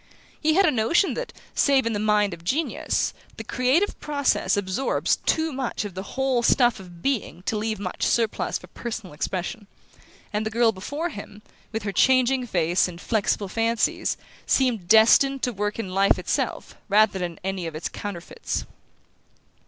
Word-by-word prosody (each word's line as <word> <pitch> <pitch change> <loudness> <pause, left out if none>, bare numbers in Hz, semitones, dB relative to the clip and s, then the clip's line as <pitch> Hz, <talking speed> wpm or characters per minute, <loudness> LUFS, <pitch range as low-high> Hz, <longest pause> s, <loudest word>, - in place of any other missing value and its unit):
He 315 0 +3
had 390 +2 +5
a 330 - +4
notion 255 - +2
that, - - -5 0.2
save 275 -3 +3
in 230 - 0
the 205 - -1
mind 210 -2 +2
of 165 -1 -10
genius, 295 - -1 0.2
the - - -5
creative 265 +11 +1
process 285 -7 +1
absorbs 200 +6 0
too 320 -1 +1
much 260 -5 -3
of 200 - -6
the 185 - -5 0.2
whole 265 -2 +2
stuff 240 -1 +3
of 175 -3 -13
being 235 -9 -2
to 220 - -1
leave 215 0 -2
much 185 -3 -5
surplus 230 -3 0
for - - -13
personal 220 -7 -7
expression; 185 +6 -4 0.7
and 210 +1 0
the 220 - -2
girl 230 +1 +3
before 285 - -4
him, 210 -5 -10 0.3
with 220 -1 -3
her 200 - -2
changing 255 +2 +3
face 175 -2 +2
and 175 -1 -9
flexible 205 0 0
fancies, 225 +3 0 0.3
seemed 240 -9 +1
destined 245 +6 +5
to 245 - 0
work 205 0 -2
in 195 -5 -4
life 195 +1 +4
itself - - -2
rather 210 -1 +4
than 175 -1 -3
in - - -18
any 190 -2 -3
of 160 - -7
its 155 - -3
counterfeits. 195 -4 -5
220 Hz, 170 wpm, -24 LUFS, 195-260 Hz, 0.7 s, had